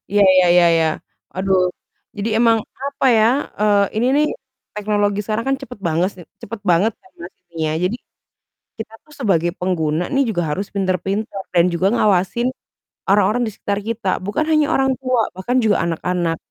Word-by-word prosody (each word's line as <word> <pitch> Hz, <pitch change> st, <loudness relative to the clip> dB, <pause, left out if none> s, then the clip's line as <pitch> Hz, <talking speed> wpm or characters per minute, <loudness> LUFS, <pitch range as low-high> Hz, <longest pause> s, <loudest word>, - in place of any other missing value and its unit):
Iya 205 Hz, 0 st, +4 dB
iya 185 Hz, -1 st, +5 dB
iya 175 Hz, -1 st, +6 dB
iya. 160 Hz, -1 st, +2 dB, 0.5 s
Aduh, 190 Hz, 0 st, +2 dB, 0.6 s
jadi 210 Hz, +2 st, -2 dB
emang 230 Hz, -1 st, +4 dB, 0.3 s
apa 280 Hz, -1 st, -1 dB
ya, 215 Hz, -, +5 dB, 0.3 s
eee, 205 Hz, -1 st, +4 dB
ini 235 Hz, +3 st, +1 dB
nih, 300 Hz, +1 st, +3 dB, 0.5 s
teknologi 205 Hz, -1 st, 0 dB
sekarang 220 Hz, +2 st, -2 dB
kan 270 Hz, -, +2 dB
cepet 225 Hz, -, -9 dB
bangese 175 Hz, +4 st, 0 dB, 0.2 s
cepet 225 Hz, +1 st, -7 dB
banget 195 Hz, +7 st, +3 dB
kan 375 Hz, -, -22 dB
Mas -, -, -9 dB
ini 175 Hz, -1 st, -34 dB
ya, 155 Hz, -, -1 dB
jadi, 205 Hz, +6 st, 0 dB, 0.8 s
kita 220 Hz, 0 st, -7 dB
tuh 300 Hz, -, -17 dB
sebagai 175 Hz, -7 st, +1 dB
pengguna 165 Hz, -3 st, -1 dB
nih 275 Hz, -, +3 dB
juga 175 Hz, -5 st, -1 dB
harus 195 Hz, +7 st, -2 dB
pinter-pinter 195 Hz, +2 st, -2 dB
dan 170 Hz, -1 st, +5 dB
juga 170 Hz, +2 st, 0 dB
ngawasin, 210 Hz, +3 st, +1 dB, 0.6 s
orang-orang 205 Hz, +4 st, +3 dB
di -, -, -3 dB
sekitar 200 Hz, 0 st, -3 dB
kita, 230 Hz, -3 st, -3 dB, 0.2 s
bukan 210 Hz, +10 st, 0 dB
hanya 305 Hz, -1 st, +3 dB
orang 270 Hz, 0 st, +2 dB
tua 255 Hz, -3 st, +1 dB
bahkan 240 Hz, +7 st, -2 dB
juga 215 Hz, -2 st, +3 dB
anak-anak. 170 Hz, 0 st, -1 dB
205 Hz, 165 wpm, -19 LUFS, 180-230 Hz, 0.8 s, iya